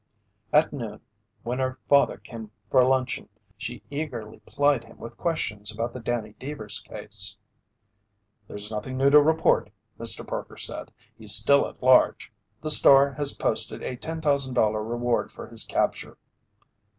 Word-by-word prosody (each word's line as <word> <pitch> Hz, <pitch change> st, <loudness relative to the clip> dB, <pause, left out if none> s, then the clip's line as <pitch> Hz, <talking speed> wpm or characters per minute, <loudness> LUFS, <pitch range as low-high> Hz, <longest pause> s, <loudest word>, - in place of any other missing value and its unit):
At 150 Hz, +1 st, +3 dB
noon 115 Hz, -7 st, -6 dB, 0.4 s
when 125 Hz, +3 st, -3 dB
her 130 Hz, 0 st, -2 dB
father 140 Hz, 0 st, +4 dB
came 115 Hz, -3 st, -10 dB, 0.2 s
for 130 Hz, -2 st, +5 dB
luncheon, 130 Hz, -3 st, 0 dB, 0.3 s
she 120 Hz, +2 st, -7 dB
eagerly 125 Hz, -8 st, -6 dB
plied 145 Hz, -4 st, +1 dB
him 115 Hz, -, -17 dB
with 115 Hz, 0 st, -10 dB
questions 105 Hz, -12 st, -3 dB
about 115 Hz, +2 st, -4 dB
the 125 Hz, -, -7 dB
Danny 115 Hz, -3 st, -3 dB
Deevers 130 Hz, -7 st, -4 dB
case. 105 Hz, -1 st, -3 dB, 1.1 s
"There's 105 Hz, +1 st, -2 dB
nothing 110 Hz, +5 st, -5 dB
new 135 Hz, +1 st, +3 dB
to 150 Hz, 0 st, +8 dB
report," 160 Hz, +2 st, +2 dB, 0.3 s
Mr. -, -, 0 dB
Parker -, -, -6 dB
said. -, -, -5 dB, 0.2 s
"He's -, -, +3 dB
still 140 Hz, 0 st, +5 dB
at -, -, -14 dB
large. 130 Hz, 0 st, +4 dB, 0.3 s
The 155 Hz, -, +1 dB
Star 140 Hz, -1 st, +7 dB
has 145 Hz, 0 st, +1 dB
posted -, -, -1 dB
a 125 Hz, -, -4 dB
$10,000 140 Hz, -7 st, 0 dB, 0.2 s
reward 120 Hz, 0 st, -1 dB
for -, -, -10 dB
his -, -, -1 dB
capture." -, -, -2 dB
125 Hz, 145 wpm, -25 LUFS, 110-140 Hz, 1.1 s, to